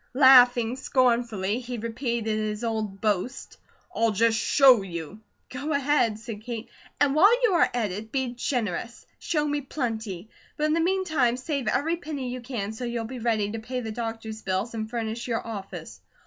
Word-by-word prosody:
Laughing 250 -3 +7
scornfully, 235 -6 +1
he 250 -1 -6
repeated 230 -1 -2
his 215 +1 -3
old 220 -4 -2
boast: 215 +4 -2 0.4
"I'll 230 0 +3
just 225 +2 +2
show 255 +1 +5
you!" 175 +1 -7 0.3
"Go 280 +5 -3
ahead," 280 -6 +2
said 220 -1 -8
Kate. 230 -1 -6 0.3
"And 285 -1 +3
while 340 +7 +7
you 450 -5 +4
are 345 - +4
at 225 -5 -1
it, 215 +4 -7
be 260 -3 -1
generous. 235 -2 -3
Show 300 -2 0
me 290 0 -1
plenty. 225 - -4 0.3
But 300 - -2
in 305 0 +2
the 330 - +2
meantime, 315 -9 +1
save 275 0 -3
every 325 +5 +1
penny 290 -6 -5
you 255 - -6
can, 235 -5 -4
so 225 - -7
you'll 235 -1 -2
be 250 +2 -7
ready 220 -3 0
to 225 - -4
pay 250 +3 -4
the 220 -2 -5
doctor's 225 -1 -5
bills 195 +4 -2
and 220 -1 -4
furnish 230 0 -3
your 230 -2 -2
office." 190 - -7
235 Hz, 175 wpm, -26 LUFS, 220-260 Hz, 0.4 s, Laughing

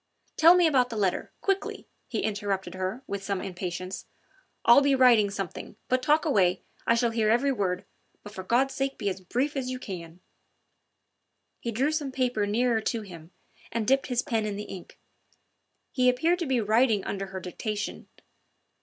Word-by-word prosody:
"Tell 335 +3 +7
me 355 -1 +5
about 260 -6 +3
the 230 - -6
letter 195 -4 -1
quickly," 390 0 -2 0.2
he 225 - -2
interrupted 205 -2 -2
her 185 +7 -4
with 200 -1 -4
some 195 -1 -2
impatience. 185 0 -5 0.6
"I'll 235 +4 +8
be 280 -1 +3
writing 240 -6 +5
something 195 0 -6
but 255 0 +2
talk 300 +5 +3
away, 190 - +2 0.2
I 230 - +5
shall 235 0 +1
hear 225 -2 +1
every 245 +5 +3
word. 190 -6 -1 0.4
But 205 - -10
for 190 - -6
God's 255 +7 +2
sake 270 0 -2
be 205 -3 -1
as 190 0 -5
brief 255 +11 -1
as 260 -2 -2
you 255 - -3
can." 175 -7 -8 1.4
He 235 - -3
drew 265 +7 +1
some 300 -3 -2
paper 250 -5 0
nearer 230 +2 +1
to 225 +1 -2
him 170 -5 -11 0.4
and 230 -1 -1
dipped 270 +1 +3
his 245 -1 0
pen 225 -6 -1
in 205 - -3
the 205 - -5
ink. 185 -4 -10 0.9
He 255 -1 +3
appeared 320 +8 +2
to 340 - -2
be 260 -2 +2
writing 220 -1 +3
under 195 0 -3
her 190 0 -6
dictation. 210 +4 -5
225 Hz, 180 wpm, -27 LUFS, 195-260 Hz, 1.4 s, I'll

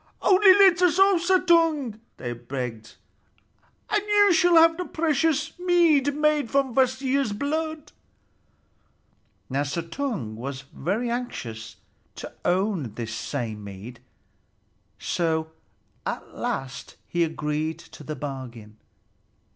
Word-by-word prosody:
"Only 385 0 +6
let 380 -3 +5
us 355 -2 +3
off, 385 -2 +5
Suttung," 330 - +2 0.2
they 120 -1 -4
begged, 120 -2 -6 0.9
"and 420 - +1
you 410 -1 +4
shall 350 0 +4
have 330 0 +6
the 360 +1 -4
precious 315 -2 0
mead 330 -6 +3
made 300 -4 +1
from 275 -1 +1
Kvasir's 260 -1 +1
blood." 310 +5 -3 1.6
Now 135 +2 -1
Suttung 165 - -4
was 130 +3 -6
very 220 - -2
anxious 115 - -5 0.4
to - - -8
own 180 - 0
this 115 -2 -5
same 115 -2 -4
mead, 100 +5 -10 1.0
so 160 -2 -1 0.5
at - - -5
last 130 -1 -5
he 175 0 0
agreed 155 0 -2
to - - -14
the 155 +1 -5
bargain. 125 -6 -8
230 Hz, 110 wpm, -25 LUFS, -, 1.6 s, Only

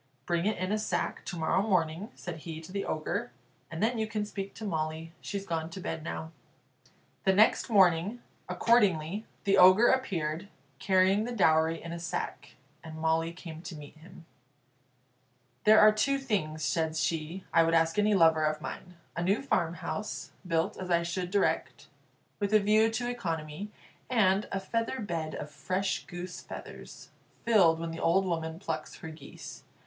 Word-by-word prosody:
"Bring 170 +2 0
it 215 - 0
in 185 +2 -2
a 215 - +1
sack 215 - -2
to 180 - -5
morrow 165 +3 +1
morning," 185 -1 0
said 175 -2 -7
he 160 0 -7
to 165 - -11
the 200 0 -3
Ogre, 205 +9 -2 0.4
"and 165 +4 -4
then 230 +1 +1
you 220 - 0
can 215 -1 -2
speak 200 -1 -6
to 220 - -7
Molly; 160 -2 -3
she's 200 -1 -5
gone 165 -3 -2
to 170 - -8
bed 160 -3 -4
now." 160 0 -5 0.9
The 190 - +4
next 215 +5 +4
morning, 190 +1 +4 0.3
accordingly, 205 -4 +2 0.2
the 195 - +3
Ogre 185 +6 +8
appeared, 175 -9 -1 0.3
carrying 190 +2 +3
the 245 - -4
dowry 160 -6 +3
in 170 - -6
a 170 - -5
sack, 170 - -5 0.3
and 160 -1 -9
Molly 160 +1 +1
came 165 -2 -9
to 175 - -8
meet 150 0 -11
him. 170 +1 -15 1.4
"There 215 +1 +8
are 215 0 +8
two 275 +6 +1
things," 185 - -2
said 160 -1 0
she, 160 +3 -2
"I 165 - +6
would 165 0 +3
ask 165 0 +3
of - - +4
any 210 0 +3
lover 160 -3 +5
of 155 0 0
mine: 180 +3 -8 0.2
a 170 - -2
new 195 +8 +1
farmhouse, 175 -1 -2 0.2
built 165 +4 0
as 185 -1 -6
I 170 -1 +3
should 175 +1 -3
direct, 200 +1 -1 0.5
with 205 +1 +1
a - - +8
view 215 +2 +4
to 230 +2 -2
economy; 165 -5 -4 0.4
and 210 -4 +3
a 195 - -1
feather 230 +6 -2
bed 165 -7 -3
of 150 - -6
fresh 185 +7 -2
goose 180 0 -7
feathers, - - -10 0.3
filled 185 -8 +5
when 165 0 -4
the 165 - -6
old 190 +4 +3
woman 165 -2 -2
plucks 160 -4 -5
her 160 - -8
geese. 160 0 -10
180 Hz, 175 wpm, -30 LUFS, 160-205 Hz, 1.4 s, Ogre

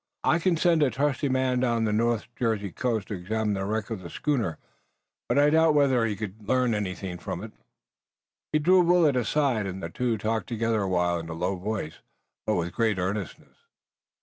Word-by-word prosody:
I 160 - +3
can 170 -1 +1
send 165 -1 +3
a 145 - +4
trusty 140 +3 0
man 130 -1 +1
down 120 -2 +1
the 105 - 0
North 115 0 +1
Jersey 110 -5 -1
coast 115 +1 -2
to - - -3
examine 105 +3 -1
the 95 -1 -2
wreck 110 +2 -2
of 110 - -3
the 90 -2 -9
schooner, 120 - -1 0.7
but - - +2
I 145 +1 +5
doubt 160 -1 +4
whether 135 -5 +3
he 105 - -2
could 105 0 -7
learn 125 -2 +2
anything 95 -3 -4
from - - -5
it." - - -8 1.0
He - - +3
drew 180 +5 +5
Willet 170 -5 +4
aside 125 -3 +1
and 95 -1 -6
the 85 - -3
two 120 +1 -1
talked 110 +1 -2
together 115 -2 0
a 95 - -1
while 90 -1 +1
in 80 0 -8
a - - -4
low 90 +4 -1
voice, 95 -4 -4 0.5
but 110 - +2
with 85 0 -2
great 110 -4 +1
earnestness. 95 0 -4
110 Hz, 200 wpm, -26 LUFS, 95-130 Hz, 1.0 s, I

